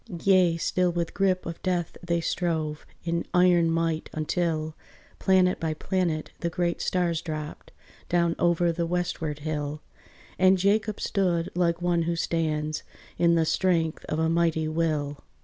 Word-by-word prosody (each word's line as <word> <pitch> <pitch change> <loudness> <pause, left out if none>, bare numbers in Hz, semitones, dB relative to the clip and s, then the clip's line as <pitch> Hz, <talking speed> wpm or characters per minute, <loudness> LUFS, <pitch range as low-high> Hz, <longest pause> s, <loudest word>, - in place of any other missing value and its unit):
Yea, 185 -4 +5
still 180 +2 +1
with 170 -1 -2
grip 190 -2 +1
of 165 0 -6
death 180 -2 -1
they 170 -1 0
strove, 160 -3 -2 0.2
In 170 0 -1
iron 175 -2 +5
might, 165 -1 -1
until, 155 0 -1 0.4
Planet 185 -1 +3
by 160 -1 -2
planet, 170 -3 -1
the 170 - -1
great 175 0 -1
stars 175 -3 0
dropped 155 -2 -6 0.4
Down 170 -1 +2
over 175 0 +3
the 170 0 -2
westward 165 -4 -2
hill: 150 -1 -3 0.6
And 185 +1 +5
Jacob 210 +3 +1
stood 175 -4 0
like 170 -1 0
one 175 -1 +2
who 170 +1 0
stands 155 -2 -1 0.4
In 170 -1 +4
the 165 -1 +3
strength 165 -2 +1
of 155 - -3
a 160 0 +2
mighty 165 -1 +1
will. 155 -3 -1
170 Hz, 150 wpm, -26 LUFS, 160-180 Hz, 0.6 s, Yea